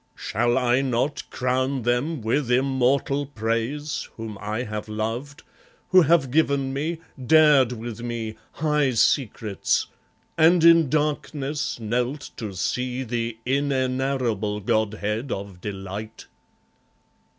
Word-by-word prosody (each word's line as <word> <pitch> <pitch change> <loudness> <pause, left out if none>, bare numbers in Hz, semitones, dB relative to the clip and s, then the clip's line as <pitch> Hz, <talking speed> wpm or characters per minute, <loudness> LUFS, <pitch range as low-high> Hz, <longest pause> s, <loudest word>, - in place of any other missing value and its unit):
Shall 120 +3 0
I 125 0 +3
not 135 +2 -1
crown 130 +1 -1
them 120 +5 0
with 120 +4 0
immortal 135 +2 +1
praise 120 +4 -2
Whom 110 -2 -6
I 105 +3 -2
have 105 -2 -5
loved, 115 +7 -4 0.5
who 185 -1 +7
have 155 -5 +3
given 140 -3 +1
me, 155 +5 -2 0.3
dared 145 -2 +5
with 115 -1 -7
me 115 -2 -4 0.2
High 150 -3 +1
secrets, 110 -4 +1 0.5
and 165 +1 +5
in 165 -3 +7
darkness 150 -1 -1
knelt 125 +5 -2
to 105 -4 -5
see 125 +6 -2
The 115 -1 -3
inenarrable 130 -5 0
godhead 110 +3 -1
of 95 -2 -6
delight? 100 +2 -6
125 Hz, 110 wpm, -24 LUFS, 110-140 Hz, 0.5 s, who